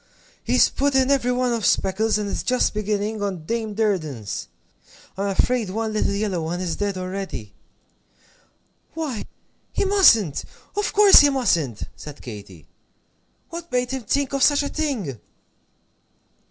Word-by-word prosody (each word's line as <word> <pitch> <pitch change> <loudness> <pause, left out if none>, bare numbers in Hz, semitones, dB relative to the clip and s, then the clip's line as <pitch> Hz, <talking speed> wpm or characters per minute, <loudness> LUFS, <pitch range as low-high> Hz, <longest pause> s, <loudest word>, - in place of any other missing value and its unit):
He's 250 +2 +4
put 280 0 -1
in 265 +1 +3
every 255 -3 +2
one 250 -1 +1
of 230 -2 -2
Speckle's, 210 +4 +2
and 210 -1 -3
is - - -3
just 255 0 +1
beginning 210 0 -2
on 190 -6 -3
Dame 220 +1 -3
Durden's. 155 - -2 0.7
I'm 200 +2 -2
afraid 220 +2 +1
one 220 +2 -2
little 210 -1 0
yellow 200 -4 -1
one 165 +2 -3
is 180 -3 -2
dead 200 -2 -2
already 185 - -5 0.7
" - - -36
"Why, 300 -9 -4 0.5
he - - 0
mustn't 230 - +4 0.3
of 415 0 0
course 410 -1 +8
he 290 - +6
mustn't!" 175 - 0
said 150 -1 -10
Katy; 100 - -10 0.8
"what 340 0 -8
made 250 0 0
him 265 -1 -3
think 280 +5 0
of 275 - -1
such 290 +1 +4
a 285 - -3
thing?" 230 - -3
215 Hz, 150 wpm, -23 LUFS, 185-260 Hz, 0.8 s, course